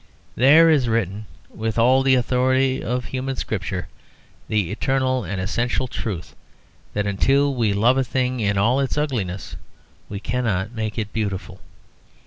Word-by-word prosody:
There 150 Hz, +7 st, +6 dB
is 145 Hz, -7 st, +3 dB
written, 105 Hz, -2 st, -1 dB, 0.2 s
with 110 Hz, +1 st, -4 dB
all 125 Hz, +3 st, +5 dB
the 135 Hz, 0 st, +4 dB
authority 130 Hz, +1 st, +1 dB
of 125 Hz, +2 st, -2 dB
a -, -, -9 dB
human 130 Hz, 0 st, -3 dB
scripture, 95 Hz, -5 st, -3 dB, 0.6 s
the 105 Hz, -5 st, 0 dB
eternal 130 Hz, +2 st, 0 dB
and 95 Hz, +1 st, -4 dB
essential 120 Hz, +7 st, -1 dB
truth 90 Hz, -, -5 dB, 0.6 s
that 105 Hz, -1 st, 0 dB
until 135 Hz, +8 st, +2 dB
we 115 Hz, -5 st, +1 dB
love 120 Hz, +6 st, +3 dB
a -, -, +3 dB
thing 130 Hz, 0 st, -1 dB
in 100 Hz, -2 st, 0 dB
all 120 Hz, +7 st, +3 dB
its 135 Hz, +1 st, -1 dB
ugliness 110 Hz, -11 st, -2 dB, 0.5 s
we 100 Hz, -, -5 dB
cannot 110 Hz, -3 st, -1 dB
make 110 Hz, -2 st, -4 dB
it 105 Hz, -2 st, -3 dB
beautiful. 95 Hz, -4 st, -4 dB
115 Hz, 150 wpm, -22 LUFS, 100-130 Hz, 0.6 s, There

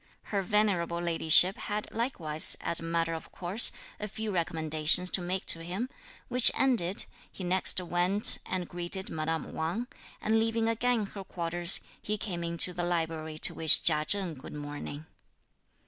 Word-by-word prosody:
Her 200 Hz, -, -1 dB
venerable 190 Hz, -4 st, -1 dB
Ladyship 170 Hz, +2 st, +4 dB
had 210 Hz, +1 st, -6 dB
likewise, 170 Hz, -, +3 dB
as 170 Hz, -, +1 dB
a -, -, -10 dB
matter 165 Hz, 0 st, -3 dB
of 160 Hz, -, -10 dB
course, 185 Hz, +6 st, +2 dB, 0.3 s
a 210 Hz, -, -6 dB
few 220 Hz, +1 st, -6 dB
recommendations 160 Hz, 0 st, 0 dB
to 190 Hz, -, -1 dB
make 180 Hz, +2 st, -5 dB
to 165 Hz, -, +3 dB
him, 190 Hz, +9 st, -6 dB, 0.4 s
which 250 Hz, -1 st, +6 dB
ended, 215 Hz, -9 st, 0 dB, 0.3 s
he 190 Hz, -, -10 dB
next 185 Hz, +1 st, +4 dB
went 180 Hz, +3 st, +4 dB
and 180 Hz, -2 st, -5 dB
greeted 175 Hz, +2 st, 0 dB
madame 160 Hz, +1 st, -5 dB
Wang; 170 Hz, +10 st, -4 dB, 0.3 s
and 220 Hz, +1 st, -1 dB
leaving 225 Hz, 0 st, -1 dB
again 230 Hz, -1 st, -1 dB
her 195 Hz, 0 st, -11 dB
quarters, 175 Hz, 0 st, 0 dB, 0.2 s
he 210 Hz, 0 st, -4 dB
came 180 Hz, -5 st, -6 dB
into 170 Hz, +2 st, -3 dB
the 175 Hz, 0 st, -5 dB
library 160 Hz, -2 st, -4 dB
to -, -, -3 dB
wish 160 Hz, -1 st, +5 dB
Chia 155 Hz, -2 st, +2 dB
Cheng 190 Hz, +1 st, -3 dB
good 135 Hz, -2 st, -13 dB
morning. 145 Hz, +1 st, -9 dB
175 Hz, 160 wpm, -27 LUFS, 165-205 Hz, 0.4 s, which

